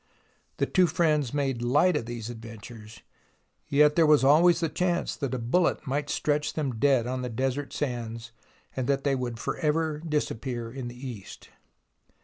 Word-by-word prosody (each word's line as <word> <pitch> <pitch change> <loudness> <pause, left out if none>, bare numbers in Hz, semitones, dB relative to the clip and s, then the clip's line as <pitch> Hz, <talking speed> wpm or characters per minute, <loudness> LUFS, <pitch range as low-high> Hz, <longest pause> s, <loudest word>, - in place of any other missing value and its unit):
The - - +1
two 185 -1 +3
friends 150 -5 +1
made 135 -4 -1
light 145 +9 +3
of 115 -6 -2
these 120 -1 -5
adventures, 110 -1 -11 0.7
yet 150 +1 +4
there 165 -2 +5
was 150 -3 +5
always 165 +5 +5
the 165 - 0
chance 175 +2 -1
that 135 -3 -2
a - - -1
bullet 135 +9 +1
might 145 +2 -2
stretch 150 0 0
them 135 -7 -3
dead 135 -2 +3
on 130 +1 -3
the 125 - -3
desert 135 +4 -2
sands 115 -4 -4 0.4
and 130 -2 -2
that 140 -1 +1
they 140 - +2
would 125 -3 -3
for - - -3
ever 155 -1 0
disappear 130 -7 -3
in 130 -2 -5
the 125 +2 -8
East. 110 -6 -10
135 Hz, 170 wpm, -27 LUFS, 120-150 Hz, 0.7 s, there